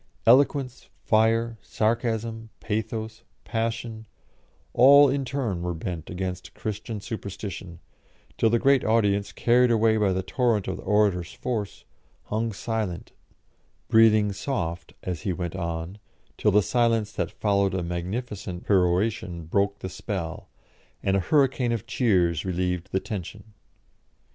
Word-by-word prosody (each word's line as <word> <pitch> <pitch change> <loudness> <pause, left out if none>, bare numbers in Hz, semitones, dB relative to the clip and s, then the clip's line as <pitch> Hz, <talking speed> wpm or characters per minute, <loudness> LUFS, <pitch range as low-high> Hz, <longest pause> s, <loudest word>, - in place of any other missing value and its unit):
Eloquence, 130 +1 +3
fire, 115 +1 +2
sarcasm, 115 0 -1
pathos, 110 0 -3 0.2
passion, 115 -1 -3 0.7
all 140 +3 +8
in 140 +1 0
turn 125 -9 -2
were 90 -1 -2
bent 80 -1 -5
against 90 0 -5
Christian 110 +1 -5
superstition, 100 -5 -6 0.6
till 115 - +3
the 120 - +3
great 135 +2 +3
audience, 100 -3 +2
carried 125 +1 +3
away 110 -1 +3
by 105 -3 +2
the 95 0 -1
torrent 115 -2 0
of - - -3
the - - -9
orator's 100 -4 +1
force, 110 -6 -4 0.4
hung 110 +2 -2
silent, 105 -3 -4 0.8
breathing 110 -2 +5
soft, 85 - -4
as 90 -3 -4
he 95 - -1
went 90 0 -4
on, 85 +2 -4 0.4
till 105 - +2
the 105 0 +4
silence 115 -3 +1
that 90 -5 -2
followed 100 -3 +1
a 90 - -1
magnificent 90 +2 -4
peroration 90 -2 +1
broke 100 +4 0
the 95 - -6
spell, 90 -3 -5 0.5
and 95 - +2
a - - +3
hurricane 130 - +2
of 115 -3 -2
cheers 90 - +1
relieved 90 -1 -2
the 95 - +1
tension. 100 +2 -7
105 Hz, 130 wpm, -26 LUFS, 95-115 Hz, 0.8 s, all